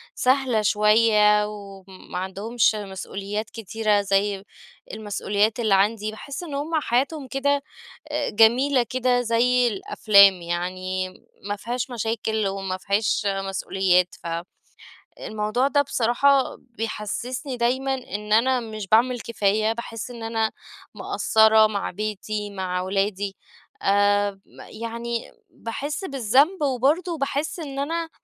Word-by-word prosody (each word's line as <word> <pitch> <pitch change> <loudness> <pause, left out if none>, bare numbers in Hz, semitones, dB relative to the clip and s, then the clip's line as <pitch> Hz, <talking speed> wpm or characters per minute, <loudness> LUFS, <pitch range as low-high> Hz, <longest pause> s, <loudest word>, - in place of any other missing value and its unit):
سهلة 255 -4 +2
شوية 210 0 +4
وما 195 -3 -10
عندهمش 215 +4 0
مسؤوليات 200 +1 -5
كتيرة 215 -1 0
زي 195 0 0 0.5
المسؤوليات 210 +1 -1
اللي 215 -4 +2
عندي، 210 +2 +1
باحس 280 +9 -7
إن 305 -4 -7
هم 310 +3 -2
حياتهم 270 +4 -1
كده 280 +2 0 0.5
آآ، 295 0 -1
جميلة 245 +5 +4
كده 250 -1 +1
زي 245 +1 +2
الأفلام، 200 -1 +5
يعني 185 +2 -3 0.4
ما 205 - -1
فيهاش 245 +4 -4
مشاكل 220 -2 -2
وما 195 -1 -3
فيهاش 205 +2 0
مسؤوليات، 195 -2 +1
ف - - -9 0.9
الموضوع 215 +5 -1
ده 285 0 +3
بصراحة 265 +1 +2
بيحسسني 245 +3 -5
دايمًا 260 +3 0
إن 210 -5 -4
أنا 255 +3 +3
مش 215 -3 -7
باعمل 240 +3 +3
كفاية، 215 0 0
باحس 235 +1 -7
إن 230 -2 -9
أنا 225 -1 0 0.4
مقصرة 220 0 +4
مع 205 -2 -3
بيتي، 210 +1 -4
مع 185 -2 -3
أولادي 195 +1 -1 0.5
آمم، 205 0 +2 0.4
يعني 235 0 -4 0.2
باحس 290 - -5
بالذنب، 275 - +2
وبرضه 290 +6 +1
باحس 290 +4 -2
إن 275 -3 -6
أنا 330 +3 -2
220 Hz, 115 wpm, -24 LUFS, 200-250 Hz, 0.9 s, الأفلام